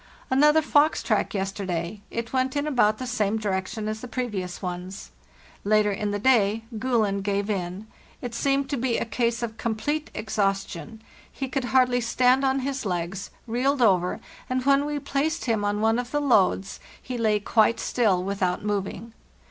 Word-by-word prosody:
Another 300 +4 +5
fox 295 +1 +3
track - - 0
yesterday; 190 -1 -3
it 230 +1 -5
went 260 +1 0
in 285 0 0
about 240 -7 +2
the 255 - -5
same 220 -4 0
direction 210 +1 -2
as 215 0 -3
the 250 - -6
previous 210 -8 -4
ones. 180 +1 -6 0.5
Later 210 0 +3
in 205 +1 -2
the 205 - -1
day 220 -2 +3 0.2
'Gulen' 220 -5 +1
gave 200 +1 -1
in; 185 +1 -3 0.3
it 245 -2 -6
seemed 275 +3 +1
to 280 - 0
be 245 -1 0
a - - -1
case 235 +1 -1
of 225 -1 -4
complete 290 +7 -2
exhaustion, 200 0 -2 0.3
he 270 - -4
could 260 0 -2
hardly 250 0 +3
stand 250 +3 +3
on 270 0 +2
his 275 +1 -3
legs, 180 0 -3 0.2
reeled 250 +3 +1
over, 180 -4 +3 0.3
and 255 0 -1
when 280 +1 +4
we 295 0 -2
placed 290 +3 -1
him 225 -4 0
on 205 +1 0
one 225 +2 +3
of 245 -1 -4
the 295 - 0
loads 200 -8 +2 0.2
he 250 - -6
lay 215 -3 +2
quite 220 +2 +2
still 200 -7 +1
without 190 -2 -1
moving. 205 +2 -3
225 Hz, 170 wpm, -25 LUFS, 200-255 Hz, 0.5 s, Another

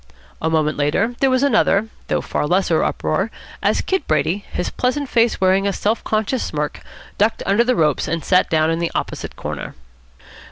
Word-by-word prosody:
A 160 - +1
moment 155 -1 +1
later 175 +11 +1
there 270 - +3
was 255 +1 +2
another, 220 -6 +3 0.2
though - - +1
a - - -2
far 150 - -2
lesser, 175 -1 +2
uproar, 190 +8 -1 0.3
as - - +2
Kid 380 -6 -1
Brady, 155 +6 0
his 180 - -2
pleasant 260 +2 -1
face 235 -1 +2
wearing 190 +1 +3
a 200 - 0
self 215 +4 -1
conscious 220 +4 0
smirk, - - -3 0.4
ducked 215 +2 +2
under 200 +4 +3
the 250 +1 +1
ropes 150 -4 +1
and 165 0 -2
sat 185 -1 +3
down 160 0 +2
in 165 - -1
the 170 -1 0
opposite - - -4
corner. - - -6
195 Hz, 190 wpm, -20 LUFS, 160-235 Hz, 0.4 s, there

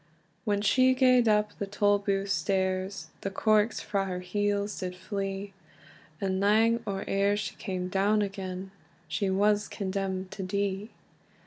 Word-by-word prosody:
When 205 -2 +1
she 255 +5 +4
gaed 255 -2 +5
up 210 -1 +2
the 200 - -2
Tolbooth 200 -1 +1
stairs, 190 0 -1
The 195 - -2
corks 215 +2 +2
frae 200 -2 -1
her 180 -1 -3
heels 205 +2 -1
did 180 -1 -4
flee; 195 +1 -4 0.7
And 190 -1 -1
lang 220 +3 +4
or 195 -1 -3
eer 200 +1 +2
she 210 0 -3
cam 185 -1 -3
down 200 +3 +2
again, 190 -1 -5 0.4
She 200 - -1
was 205 +2 +2
condemned 190 -1 -3
to 200 - -6
die. 200 +2 -2
200 Hz, 140 wpm, -29 LUFS, 190-210 Hz, 0.7 s, gaed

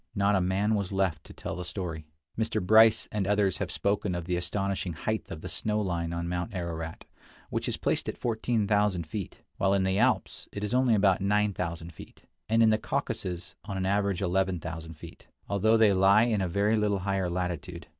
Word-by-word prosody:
Not 100 0 +2
a 95 - +2
man 95 +4 +1
was 100 -3 -1
left 95 -3 0
to - - -12
tell - - -5
the 90 - -5
story. 85 -4 -5 0.3
Mr. 110 0 0
Bryce 110 +3 +5
and 105 -3 -1
others 100 -2 +2
have - - -2
spoken 100 -2 0
of 85 -1 -4
the 90 0 -1
astonishing 95 0 -2
height 110 +7 -3
of 80 - -7
the - - -6
snow 105 0 -1
line 85 -4 -2
on 85 0 -3
Mount 90 +4 -3
Ararat, 80 -2 -5 0.5
which - - -2
is - - 0
placed - - -1
at - - -5
14,000 105 -5 +1
feet; 95 +5 -6
while 95 0 +2
in 95 - +2
the 95 +1 +1
Alps 125 0 +1
it 105 - -5
is 105 - -2
only 125 -2 +4
about 100 -2 +3
9000 90 -5 -1
feet, - - -13 0.3
and 115 +1 +4
in 110 - +5
the 110 - +2
Caucasus 90 -5 -3
on 100 -2 -4
an 95 - -1
average 100 -1 0
11,000 85 -3 -2
feet, 75 - -13 0.2
although 110 +3 +3
they 110 -3 +5
lie 95 +3 +5
in 110 -4 +1
a 95 - 0
very 100 +5 +2
little 105 -2 +1
higher 95 -1 -1
latitude. 85 -1 -4
95 Hz, 200 wpm, -28 LUFS, 90-105 Hz, 0.5 s, Bryce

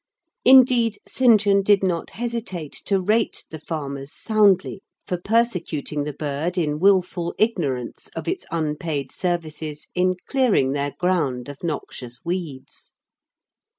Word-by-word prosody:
Indeed, 250 -3 +6
St. 240 -4 +5
John 200 -1 +3
did 200 0 +3
not 175 -3 -1
hesitate 225 -10 -4
to 195 -1 +2
rate 215 +5 0
the 160 - -7
farmers 140 -3 -5
soundly 200 -3 +2 0.2
for 180 - -2
persecuting 175 - -1
the 150 - -3
bird 150 +5 -3
in 150 -3 0
wilful 180 -2 +2
ignorance 145 - -1
of - - -5
its - - -2
unpaid 150 -3 -2
services 155 -4 -3
in 185 0 +2
clearing 240 - +2
their 140 0 -2
ground 150 -9 0
of 145 +2 -10
noxious 130 -6 -6
weeds. 170 -7 -5
175 Hz, 125 wpm, -23 LUFS, 150-200 Hz, 0.2 s, Indeed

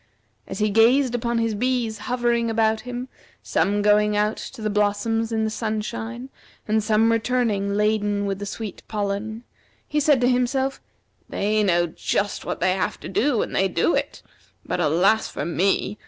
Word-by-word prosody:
As - - -6
he 215 -1 +1
gazed 240 +4 +4
upon 235 0 -1
his 230 -1 0
bees 235 -1 -1
hovering 240 -1 +1
about 220 -1 +1
him, 250 +1 -6 0.4
some 205 +1 +1
going 210 0 +3
out 210 +1 +1
to - - -8
the 215 - 0
blossoms 210 +2 0
in 220 -1 0
the 220 - -1
sunshine, 225 +3 -4 0.4
and 215 0 +1
some 220 +1 +3
returning 225 -4 0
laden 205 -1 +1
with 195 -1 -2
the 205 - -5
sweet 215 0 -6
pollen, 210 +2 -3 0.4
he 300 - 0
said 290 -2 +4
to 245 - +3
himself, 260 +2 0 0.5
"They 215 +2 0
know 175 -4 +3
just 200 +4 -2
what - - -3
they 185 +1 +3
have 190 - -2
to - - -7
do, 235 +4 +1
and - - -6
they 195 - +3
do 180 - +1
it; - - -2 0.4
but - - -2
alas 180 +7 +3
for 145 - -5
me! 195 +4 0
220 Hz, 170 wpm, -23 LUFS, 205-235 Hz, 0.5 s, gazed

